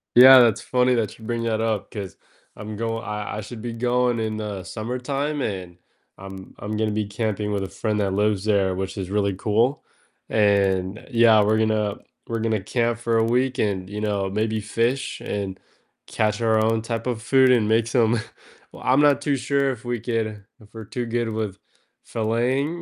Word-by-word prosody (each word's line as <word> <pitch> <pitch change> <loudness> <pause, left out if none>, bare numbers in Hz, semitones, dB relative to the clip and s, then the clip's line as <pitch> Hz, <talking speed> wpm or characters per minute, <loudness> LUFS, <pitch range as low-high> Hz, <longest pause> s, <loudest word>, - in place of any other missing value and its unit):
Yeah, 130 +1 +10
that's 115 -2 +4
funny 125 0 +2
that 110 -3 -2
you 110 - -12
bring 115 0 -2
that 110 -1 0
up, 110 -3 -2
'cause 100 -5 -7 0.4
I'm 110 0 -7
going 115 +1 -3
I 105 -1 -4
I - - -3
should 110 +2 -9
be 120 -1 -5
going 125 0 +1
in 110 -1 -2
the 105 -3 -5
summertime, 135 - -3
and 90 -6 -4 0.4
I'm 95 0 -10
I'm 105 +1 -5
gonna 110 -1 0
be 105 0 -1
camping 105 0 -2
with 100 -1 -1
a 95 - -5
friend 105 +1 -2
that 100 -2 0
lives 105 -1 +1
there, 100 -3 +2
which 95 +1 -4
is 95 -1 -4
really 100 -2 0
cool, 115 +8 +1 0.5
and 100 -2 +1
Yeah, 115 -3 +6
we're 110 +1 +2
gonna 110 -2 0 0.3
we're 115 -1 -2
gonna 110 -2 0
camp 120 +2 0
for 115 -1 0
a 110 - +3
week, 125 +3 +1
and, 95 -3 -1
you 105 +1 -5
know, 100 -2 -1
maybe 110 +2 -1
fish, 115 +5 -1
and 100 -2 -4 0.5
catch 105 0 -1
our 110 -1 +3
own 110 0 +1
type 115 0 -4
of 120 -3 -2
food, 130 +1 +4
and 115 -4 +3
make 110 0 +3
some 115 -1 +2 0.5
Well, - - -12
I'm 130 +3 +4
not 145 -1 +4
too 145 -1 +1
sure 140 +1 +1
if 125 0 -8
we 120 -1 -2
could 110 -3 -3 0.2
if 105 0 -19
we're 110 -1 -8
too 120 +3 -4
good 115 0 -1
with 110 -3 -3 0.5
filleting, 125 +9 -1
110 Hz, 195 wpm, -23 LUFS, 105-120 Hz, 0.5 s, Yeah